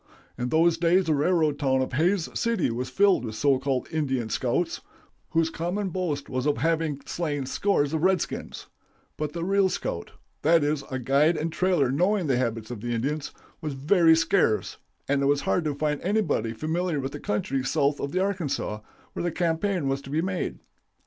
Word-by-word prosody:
"In 125 +1 -3
those 165 +2 +3
days 175 +2 +3
the 160 - +2
railroad 150 -1 +2
town 130 -2 +2
of 130 - -6
Hays 170 +5 +2
City 230 - 0
was 125 +2 -3
filled 200 -5 +3
with 110 -2 -5
so 135 +2 +2
called 135 -1 -1
'Indian 135 -7 -1
scouts,' 125 +9 -1 0.5
whose 165 0 +1
common 185 +5 -2
boast 160 -6 -2
was 130 +2 -2
of 145 - +1
having 160 0 0
slain 145 -5 -2
scores 145 0 +1
of 160 - 0
redskins; 185 -1 -1 0.5
but 150 -1 -3
the 170 -1 -3
real 195 +1 +3
scout - - -4 0.3
that 165 0 +4
is, 145 -1 0
a 130 - -2
guide 140 +6 +3
and 160 +1 -2
trailer 175 -9 +2
knowing 180 +6 +2
the 135 -4 +2
habits 115 -2 -2
of 115 -4 -6
the 120 0 -2
Indians 140 +6 -2 0.3
was 150 -4 -4
very 160 +4 +5
scarce, 165 - +1 0.3
and 140 0 +1
it 140 - +2
was 145 0 +2
hard 180 - +1
to 150 -2 -1
find 150 0 -1
anybody 190 - 0
familiar 160 +6 -1
with 135 0 -3
the - - -7
country 130 +6 -1
south 140 +1 +1
of 140 - -3
the 185 - 0
Arkansas, 180 - -1 0.3
where - - -4
the 175 - -1
campaign 170 0 0
was 135 0 -1
to 135 - -11
be 155 +4 0
made. 185 -1 -2
150 Hz, 190 wpm, -26 LUFS, 135-175 Hz, 0.5 s, very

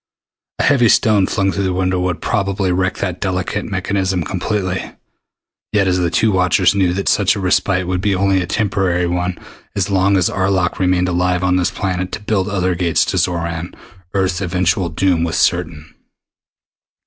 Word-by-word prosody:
A - - -1
heavy 120 -5 +4
stone 105 -4 +3
flung 95 -2 0
through 100 +1 -2
the 95 - 0
window 90 0 0
would 90 -2 -2
probably 100 -2 0
wreck 95 +1 0
that 90 -2 -3
delicate 95 +2 -2
mechanism 95 -2 -1
completely, 95 +1 -3 0.8
yet 105 -2 +3
the 90 -2 +1
two 110 +6 +2
watchers 90 +1 +3
knew 95 -3 +2
that 100 +1 -3
such 100 0 +3
a - - -4
respite 95 0 +1
would 90 0 -2
be 100 -1 +1
only 95 0 +2
a 85 - -4
temporary 95 -3 0
one. 90 +1 -2 0.4
As 100 0 -1
long 95 +1 +3
as 90 - +2
Arlok 95 -2 0
remained 90 -1 +2
alive 90 0 0
on 90 0 +2
this 90 - +1
planet 90 -1 -3
to - - -3
build 105 -2 -1
other 95 -3 0
gates 85 -2 +1
to - - -2
Xoran, 85 -1 -2 0.4
Earth's 95 -1 0
eventual 90 -1 0
doom 85 0 +1
was 85 -1 -1
certain. 80 -3 -1
95 Hz, 170 wpm, -17 LUFS, 90-95 Hz, 0.8 s, heavy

